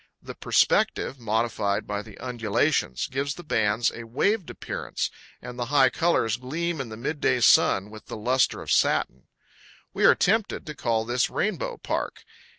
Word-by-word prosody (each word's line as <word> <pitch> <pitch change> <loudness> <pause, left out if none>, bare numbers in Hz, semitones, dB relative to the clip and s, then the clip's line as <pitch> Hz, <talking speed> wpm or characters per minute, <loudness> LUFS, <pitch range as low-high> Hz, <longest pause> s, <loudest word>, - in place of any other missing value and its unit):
The - - -9
perspective, 135 - +1
modified 110 -2 -1
by 105 0 -3
the 105 -1 -13
undulations, 115 - 0
gives 140 +2 -3
the 175 - -10
bands 110 -5 +1
a 115 - -7
waved 185 - 0
appearance, - - -4 0.3
and 125 0 -8
the 120 - -1
high 135 -2 +4
colors 165 -10 +1
gleam 160 +5 -3
in 125 - -6
the 110 - -8
midday 135 +1 0
sun 105 -3 +4
with 110 0 -12
the - - -6
luster 125 +4 +1
of - - -5
satin. 65 +1 +1 0.7
We - - +1
are - - +7
tempted 215 +2 0
to 150 - -6
call 115 -6 -1
this 125 +2 +1
Rainbow 470 - -2
Park. - - -4
125 Hz, 160 wpm, -25 LUFS, 110-150 Hz, 0.7 s, are